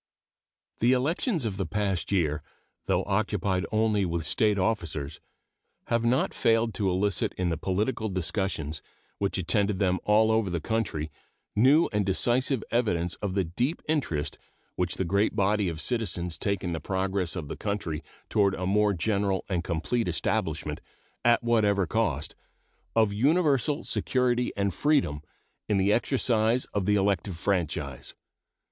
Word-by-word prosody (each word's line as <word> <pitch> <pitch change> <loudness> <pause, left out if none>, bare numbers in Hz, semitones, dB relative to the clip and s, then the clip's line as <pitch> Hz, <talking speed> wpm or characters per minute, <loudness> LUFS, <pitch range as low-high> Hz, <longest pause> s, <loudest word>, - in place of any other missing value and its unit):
The 120 +3 +4
elections 160 - 0
of 100 -4 -2
the 95 - -1
past 100 -4 -1
year, 80 -6 +1 0.5
though - - +2
occupied 100 -2 0
only 110 -2 +2
with 85 -3 -1
State 105 +5 +2
officers, 85 -8 -2 0.7
have 115 0 +1
not 120 +3 +2
failed 115 0 +2
to 100 -3 0
elicit 95 +1 0
in 90 -1 -1
the 85 - 0
political 105 +7 -1
discussions 90 -4 -2 0.4
which 100 -1 -1
attended 100 +2 +1
them 95 -1 +1
all 110 +1 +4
over 110 -3 +2
the 85 -1 -1
country 85 -6 -2 0.4
new 135 +9 +5
and 105 0 +2
decisive 120 +6 +1
evidence 90 -8 +1
of 100 -2 -2
the 95 - +2
deep 120 - -2
interest 135 - -1 0.4
which 90 -2 -1
the 95 - -1
great 100 +5 +1
body 100 -1 +2
of 80 -2 -5
citizens 90 -7 -1
take 100 -2 -1
in 90 -2 -2
the 80 - -2
progress 95 0 -2
of 80 -6 -4
the - - -5
country 95 -7 -3 0.2
toward 100 -2 +2
a 90 - -3
more 105 +2 +3
general 100 +1 0
and 90 -3 0
complete 95 +8 -1
establishment, 90 - -1 0.4
at 120 0 +4
whatever 105 -4 +3
cost, 80 -6 -1 0.6
of 110 -3 +3
universal 145 - +2
security 125 -1 +1
and 100 -2 0
freedom 135 - +1 0.5
in 105 - +3
the 100 +2 +3
exercise 120 -1 +2
of 100 -2 -1
the 105 - +4
elective 100 -2 0
franchise. 80 -7 -2
100 Hz, 150 wpm, -27 LUFS, 90-115 Hz, 0.7 s, new